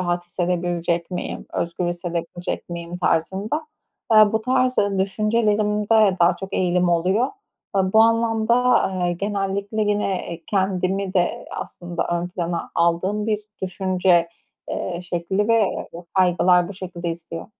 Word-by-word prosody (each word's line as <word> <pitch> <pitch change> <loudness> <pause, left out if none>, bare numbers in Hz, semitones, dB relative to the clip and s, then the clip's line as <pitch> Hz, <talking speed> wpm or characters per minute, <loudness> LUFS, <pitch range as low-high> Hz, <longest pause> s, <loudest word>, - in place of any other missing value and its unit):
rahat 175 -1 -1
hissedebilecek 175 -1 -1
miyim? 180 - -5
Özgür 170 +1 -2
hissedebilecek 175 0 -4
miyim?" 170 0 -6
tarzında, 195 - 0 0.4
aaa, 215 -2 +7
bu 220 - +1
tarz 255 +2 +1 0.2
düşüncelerimde 210 0 +2
daha 175 +1 +4
çok 195 - -7
eğilim 180 -1 +2
oluyor. 185 +8 +2 0.5
Eee, 195 - +4
bu 220 - +6
anlamda, 230 0 +2
aaa, 195 -8 +2
genellikle 200 +3 -2
yine, 205 -2 0
eee, 165 0 -7
kendimi 190 0 0
de 175 -1 0
aslında 175 -1 -5
ön 175 0 -1
plana 175 -1 -3
aldığım 185 +5 +1
bir 210 -1 0 0.2
düşünce, 185 -2 +2 0.4
eee, 175 -1 -3
şekli 180 +4 -1
ve, 230 - +5 0.4
eee, 170 +1 -8
kaygılar 180 -1 +4
bu 200 - -7
şekilde 180 -2 -6
istiyor. 165 0 -7
185 Hz, 130 wpm, -22 LUFS, 175-210 Hz, 0.5 s, aaa